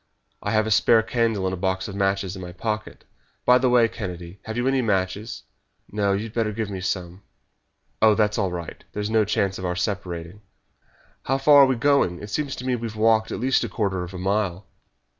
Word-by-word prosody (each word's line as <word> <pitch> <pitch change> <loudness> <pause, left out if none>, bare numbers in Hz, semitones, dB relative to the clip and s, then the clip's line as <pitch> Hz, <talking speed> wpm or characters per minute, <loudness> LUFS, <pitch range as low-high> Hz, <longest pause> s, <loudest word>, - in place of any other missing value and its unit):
"I - - -3
have 110 0 +2
a 110 - -2
spare 110 +2 +5
candle 115 -4 0
and 95 - -1
a - - -3
box 95 +1 -1
of 100 - -7
matches 95 -1 0
in 95 - -8
my 90 -1 -8
pocket. 105 +3 -4 0.4
By 125 0 +6
the 130 0 +2
way, 120 -2 +5
Kennedy, 90 -4 -7
have 110 +1 -5
you 120 +2 0
any 135 -1 +2
matches?" 100 0 -2 0.5
"No; 100 -1 +1
you 100 +2 -1
had 110 -1 -8
better 115 -2 0
give 105 -1 -4
me 95 -1 -5
some." 90 -1 -3 0.8
"Oh, 110 -1 +6
that 105 -1 +2
is 105 - -3
all 95 -2 +1
right. 85 -2 -7
There 105 - -3
is 105 +1 -3
no 110 -1 +3
chance 95 -1 0
of 95 - -5
our 90 - -2
separating." 90 -1 -4 0.8
"How 135 - +1
far 145 +1 +7
are - - +8
we 130 - +1
going? 120 -9 +2
It 105 0 -9
seems 140 0 -2
to 125 - -7
me 130 - +1
that 120 - -2
we 115 - -2
have 110 - -8
walked 110 0 +3
at - - -3
least 130 +2 +2
a - - -3
quarter 95 -5 -1
of 90 +2 -8
a - - -5
mile." 95 0 -1
105 Hz, 235 wpm, -24 LUFS, 95-115 Hz, 0.8 s, are